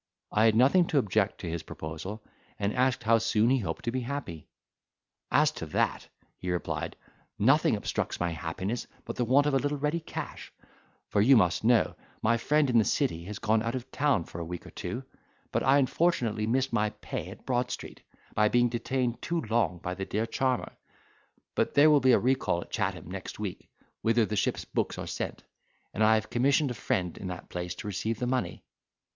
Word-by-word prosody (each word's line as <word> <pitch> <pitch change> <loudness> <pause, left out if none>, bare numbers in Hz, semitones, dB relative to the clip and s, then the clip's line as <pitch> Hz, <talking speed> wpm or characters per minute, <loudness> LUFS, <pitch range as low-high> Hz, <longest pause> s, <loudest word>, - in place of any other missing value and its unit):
I 105 +1 +4
had 110 -1 +5
nothing 140 +9 +5
to 150 - 0
object 105 -5 +1
to 90 - -5
his 85 0 -3
proposal; 80 +8 -7 0.3
and 100 +1 -1
asked 130 -1 +1
how 115 +1 +4
soon 115 +1 +2
he 135 - +3
hoped 105 - -4
to 120 - 0
be 130 +1 -1
happy. 120 - -5 0.8
"As - - +4
to - - -7
that," - - 0 0.3
he 90 - -4
replied, 90 -1 -2 0.4
"nothing 130 +4 +4
obstructs 100 - -2
my 85 0 0
happiness 90 +8 -3 0.2
but - - -5
the 125 - 0
want 135 +5 +4
of 150 - +1
a - - +5
little 145 +2 -1
ready 150 +4 0
cash; 160 - -7 0.6
for 100 - +2
you 130 +4 +7
must 90 -3 +2
know, 115 0 +4 0.3
my 115 +2 +3
friend 150 +5 +2
in 120 -3 +4
the - - +4
city 100 - 0
has 105 +1 -6
gone 110 +1 +2
out 115 +2 -2
of 130 +1 -6
town 145 - +2
for 85 - -9
a - - -2
week 85 +1 -6
or - - -11
two, 125 +3 -5 0.5
but - - +1
I 135 +2 +5
unfortunately 130 -7 +1
missed 130 +2 +1
my 105 -2 +2
pay 105 0 -6
at - - -12
Broad 125 -1 0
Street, - - -7 0.3
by 105 0 +3
being 120 +1 +3
detained 120 0 -1
too 170 -1 -1
long 105 -7 +2
by 90 +1 -4
the 95 +1 -4
dear 110 +4 -1
charmer—but 130 +1 -4
there 150 +2 +7
will 150 - +6
be 130 -1 +5
a - - +7
recall 125 -8 +1
at - - -11
Chatham 95 -5 -2
next 95 -1 -6
week, 100 -4 -6 0.3
whither 115 0 +3
the 105 - -3
ship's - - 0
books - - -2
are - - -4
sent, - - -4 0.5
and 110 - +1
I 110 +1 +6
have 110 -1 -2
commissioned 140 +3 +2
a - - -2
friend 90 -6 -1
in 95 - -5
that 90 -1 -7
place 90 0 -4
to 105 - -7
receive 110 +3 -2
the 125 - -2
money." 125 0 -2
115 Hz, 205 wpm, -29 LUFS, 100-130 Hz, 0.8 s, you